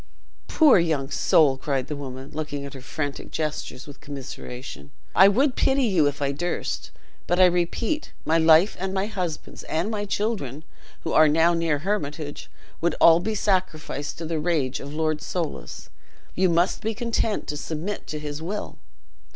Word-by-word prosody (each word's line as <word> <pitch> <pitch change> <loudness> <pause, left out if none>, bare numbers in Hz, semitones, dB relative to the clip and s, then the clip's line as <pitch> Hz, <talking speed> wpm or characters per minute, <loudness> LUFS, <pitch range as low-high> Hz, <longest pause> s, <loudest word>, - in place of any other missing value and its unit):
"Poor 300 - +6
young 155 -5 0
soul!" 140 -4 +4
cried 135 -2 -1
the 150 - -5
woman, 135 -1 -7
looking 145 -2 -4
at 140 - -8
her 135 - -9
frantic 145 +2 -4
gestures 150 -4 -4
with 145 -1 -12
commiseration; 125 - -8 0.3
"I 190 +3 +8
would 250 +7 +3
pity 270 0 +2
you 185 -10 +3
if 145 0 -2
I 140 - +1
durst; 175 +5 -3 0.4
but 175 - +1
I 185 - +8
repeat, 180 - 0
my 165 +1 +3
life, 160 +5 +5
and 190 +1 -3
my 190 +1 +1
husband's, 180 -7 -5
and 170 +7 -1
my 205 -1 -2
children, 195 - -2 0.4
who - - -3
are 155 0 +7
now 165 +3 +4
near 165 -3 +1
Hermitage, 150 -4 -3 0.3
would 170 +1 +1
all 165 0 +7
be 215 +5 -2
sacrificed 180 -8 -1
to 165 - -5
the 160 0 -2
rage 150 -5 0
of 140 - -8
Lord 155 0 -1
Soulis. 170 -4 -5 0.4
You 185 0 +2
must 170 +3 +2
be 220 0 -2
content 225 -1 -1
to 150 - -2
submit 160 +7 -4
to 155 - -4
his 150 0 -5
will." 200 +6 -5
160 Hz, 170 wpm, -25 LUFS, 145-190 Hz, 0.4 s, I